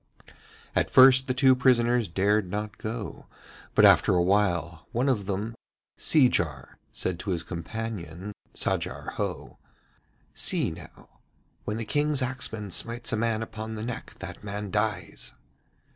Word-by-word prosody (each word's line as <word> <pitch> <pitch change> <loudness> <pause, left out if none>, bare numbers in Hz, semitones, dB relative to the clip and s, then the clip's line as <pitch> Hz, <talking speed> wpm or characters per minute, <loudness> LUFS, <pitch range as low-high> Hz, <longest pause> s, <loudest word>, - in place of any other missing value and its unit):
At - - +2
first 130 0 +7
the 130 - +1
two 130 -1 +5
prisoners 120 -2 +3
dared 100 +3 +1
not 105 +2 -4
go, 110 - -6 0.5
but - - +7
after - - +6
a 90 - +3
while 85 -4 0
one 125 +4 0
of 105 -8 0
them, 105 +3 -2 0.4
Seejar, 85 - +2
said 90 -2 -3
to 105 - -5
his 85 -3 -1
companion, 95 +1 -6 0.2
Sajar - - -2
Ho: - - -4 0.7
'See - - +2
now, - - -14 0.5
when 105 - -2
the 115 - -3
King's 145 +3 +1
axeman 110 -5 -3
smites 115 +6 -2
a - - +3
man 110 0 0
upon 110 0 -6
the 110 - -5
neck 120 -1 -6
that - - -9
man 105 -1 -5
dies.' 105 -4 -2
110 Hz, 140 wpm, -27 LUFS, 95-120 Hz, 0.7 s, first